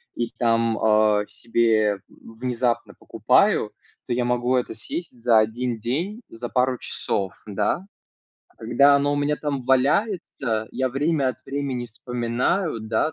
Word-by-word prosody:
и 120 Hz, -1 st, -2 dB
там, 115 Hz, -1 st, +2 dB
э, 105 Hz, -1 st, +3 dB
себе 110 Hz, -3 st, +1 dB
внезапно 120 Hz, +1 st, -3 dB
покупаю, -, -, +2 dB, 0.4 s
то -, -, -1 dB
я 125 Hz, 0 st, 0 dB
могу 125 Hz, +1 st, +1 dB
это 125 Hz, -2 st, -1 dB
съесть 165 Hz, +9 st, -6 dB
за 115 Hz, -2 st, +5 dB
1 115 Hz, +2 st, -1 dB
день, 165 Hz, -, -3 dB
за 120 Hz, +1 st, -6 dB
пару 125 Hz, 0 st, +1 dB
часов, 95 Hz, -5 st, -3 dB
да. 105 Hz, -, -1 dB, 0.7 s
Когда 140 Hz, +5 st, +4 dB
оно 145 Hz, +1 st, +1 dB
у -, -, 0 dB
меня 145 Hz, +1 st, +1 dB
там 140 Hz, -3 st, -3 dB
валяется, 135 Hz, -, +1 dB
я 130 Hz, +1 st, 0 dB
время 140 Hz, +1 st, +1 dB
от 130 Hz, 0 st, -6 dB
времени 135 Hz, -3 st, -3 dB
вспоминаю, 120 Hz, -, -1 dB
да, 110 Hz, +8 st, 0 dB
125 Hz, 135 wpm, -23 LUFS, 115-140 Hz, 0.7 s, за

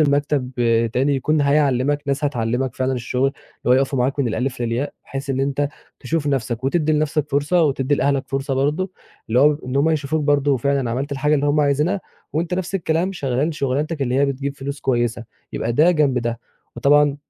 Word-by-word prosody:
لمكتب 145 Hz, -3 st, +1 dB, 0.4 s
تاني 135 Hz, +4 st, +2 dB
يكون 150 Hz, +3 st, +1 dB
هيعلِّمك، 145 Hz, -1 st, +2 dB
ناس 140 Hz, +1 st, -1 dB
هتعلِّمك 125 Hz, -1 st, -1 dB
فعلًا 130 Hz, 0 st, 0 dB
الشُغل 125 Hz, +1 st, 0 dB
اللي 135 Hz, -, -15 dB
هو -, -, +8 dB
يقفوا 135 Hz, 0 st, +2 dB
معاك 130 Hz, +3 st, 0 dB
من 135 Hz, -4 st, +1 dB
الألِف 125 Hz, +2 st, -2 dB
للياء 120 Hz, +4 st, -1 dB
بحيث 135 Hz, 0 st, -5 dB
إن 135 Hz, 0 st, 0 dB
أنت 140 Hz, +1 st, 0 dB, 0.3 s
تشوف 160 Hz, -3 st, -2 dB
نَفْسك 125 Hz, -3 st, -1 dB
وتدّي 155 Hz, +2 st, +1 dB
لنَفْسك 150 Hz, -1 st, 0 dB
فرصة 145 Hz, +5 st, +2 dB
وتدّي 140 Hz, -1 st, +1 dB
لأهلك 140 Hz, -1 st, +1 dB
فرصة 135 Hz, 0 st, -2 dB
برضه 150 Hz, +8 st, 0 dB, 0.4 s
اللي 115 Hz, +3 st, +2 dB
هو 150 Hz, +1 st, +5 dB
إن 130 Hz, +1 st, -2 dB
هم 145 Hz, +4 st, +3 dB
يشوفوك 155 Hz, 0 st, 0 dB
برضه 145 Hz, -1 st, +3 dB
فعلًا 135 Hz, -1 st, 0 dB
عملت 135 Hz, +5 st, -2 dB
الحاجة 150 Hz, +2 st, +1 dB
اللي 145 Hz, 0 st, +1 dB
هُم 150 Hz, +1 st, +3 dB
عايزينها 150 Hz, +7 st, +1 dB, 0.3 s
وأنت 170 Hz, +3 st, -1 dB
نَفْس 185 Hz, +1 st, -3 dB
الكلام 175 Hz, +1 st, 0 dB
شغّال 140 Hz, 0 st, -1 dB
شُغلانتك 145 Hz, +2 st, -1 dB
اللي 125 Hz, -1 st, -1 dB
هي 140 Hz, +2 st, +3 dB
بتجيب 140 Hz, +1 st, -3 dB
فلوس 140 Hz, +1 st, -5 dB
كويسة، 120 Hz, -2 st, 0 dB, 0.3 s
يبقى 115 Hz, -, -2 dB
ده 155 Hz, +8 st, +5 dB
جنب 145 Hz, -6 st, +2 dB
ده. 120 Hz, 0 st, -3 dB, 0.4 s
وطبعًا 145 Hz, +3 st, +4 dB
140 Hz, 185 wpm, -21 LUFS, 130-150 Hz, 0.4 s, هو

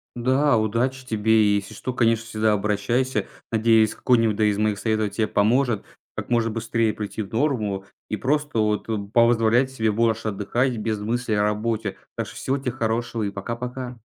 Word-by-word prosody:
Да. 130 Hz, +2 st, +2 dB
Удачи 120 Hz, +5 st, -1 dB
тебе. 110 Hz, -2 st, 0 dB
И 105 Hz, -1 st, +3 dB
если 100 Hz, -1 st, -6 dB
что, 130 Hz, -, -5 dB
конечно, 115 Hz, -2 st, +2 dB
всегда 110 Hz, -1 st, +1 dB
обращайся. 105 Hz, +6 st, 0 dB, 0.2 s
Надеюсь, 110 Hz, -1 st, +4 dB
какой-нибудь 115 Hz, -4 st, +2 dB
да 110 Hz, -, +2 dB
из 105 Hz, -1 st, +2 dB
моих 105 Hz, -1 st, 0 dB
советов 110 Hz, -2 st, 0 dB
те 110 Hz, +2 st, 0 dB
поможет, 110 Hz, +2 st, +2 dB, 0.3 s
как -, -, -5 dB
можно 115 Hz, -1 st, +2 dB
быстрее 115 Hz, 0 st, 0 dB
прийти 105 Hz, +1 st, -5 dB
в 100 Hz, -, -7 dB
норму 110 Hz, -7 st, 0 dB, 0.2 s
и 105 Hz, -, -2 dB
просто, 145 Hz, 0 st, -1 dB
вот, 105 Hz, 0 st, 0 dB
э, 110 Hz, -, 0 dB, 0.2 s
позволять 115 Hz, +2 st, +4 dB
себе 110 Hz, -4 st, 0 dB
больше 110 Hz, 0 st, +1 dB
отдыхать 120 Hz, +6 st, 0 dB
без 110 Hz, -1 st, -2 dB
мыслей 115 Hz, +1 st, -1 dB
о 105 Hz, -, +2 dB
работе. 105 Hz, -1 st, -1 dB, 0.2 s
Так -, -, -2 dB
что -, -, -11 dB
всего 135 Hz, +1 st, -1 dB
те 135 Hz, -2 st, -3 dB
хорошего 115 Hz, -1 st, -2 dB
и 100 Hz, -, -1 dB
пока-пока. 120 Hz, +4 st, -5 dB
115 Hz, 180 wpm, -23 LUFS, 105-120 Hz, 0.3 s, Надеюсь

